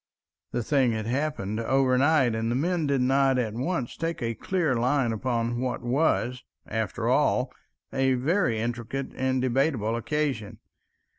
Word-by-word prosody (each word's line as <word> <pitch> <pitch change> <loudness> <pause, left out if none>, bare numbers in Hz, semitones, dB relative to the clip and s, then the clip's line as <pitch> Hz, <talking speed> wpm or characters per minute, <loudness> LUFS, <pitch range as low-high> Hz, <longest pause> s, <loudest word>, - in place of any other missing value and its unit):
The 120 0 -1
thing 130 -2 +2
had 110 -1 -3
happened 120 -5 -2
overnight, 130 +2 +3
and 110 0 -1
the 120 - 0
men 165 +3 0
did 140 -2 +1
not 135 +1 +3
at 115 -4 -1
once 130 +1 -2
take 165 0 -3
a 115 0 -1
clear 170 +2 0
line 125 +1 +1
upon 120 +1 -1
what 125 -1 -2
was, 125 -1 +1 0.2
after 110 -3 -2
all, - - +2 0.4
a 135 -1 +2
very 130 - +1
intricate 120 +4 -3
and 130 0 0
debatable 125 -3 +1
occasion. 120 -4 -2
130 Hz, 145 wpm, -26 LUFS, 115-140 Hz, 0.4 s, overnight